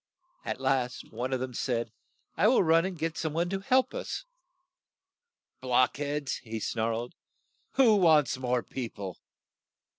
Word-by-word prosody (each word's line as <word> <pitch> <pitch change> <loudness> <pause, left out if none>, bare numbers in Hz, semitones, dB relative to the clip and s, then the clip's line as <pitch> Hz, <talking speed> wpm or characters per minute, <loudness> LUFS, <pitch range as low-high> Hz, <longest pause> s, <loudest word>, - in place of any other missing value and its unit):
At - - -4
last 130 -2 -1
one 125 +4 -3
of 130 - 0
them 130 0 -4
said, 115 -2 -1 0.4
"I 195 - +4
will 245 -3 +5
run 165 +1 +4
and 190 -2 -4
get 165 +1 -2
some 160 -2 -2
one 170 +2 0
to 195 - -1
help 255 +6 +2
us." - - -4 1.4
"Block 125 0 +3
heads!" 145 -1 -2
he 110 -2 -6
snarled. 115 +2 -2 0.6
"Who 235 -6 +5
wants 155 -7 +4
more 125 -1 0
peo 125 -3 -5
ple? 95 -4 -7
135 Hz, 150 wpm, -29 LUFS, 120-170 Hz, 1.4 s, will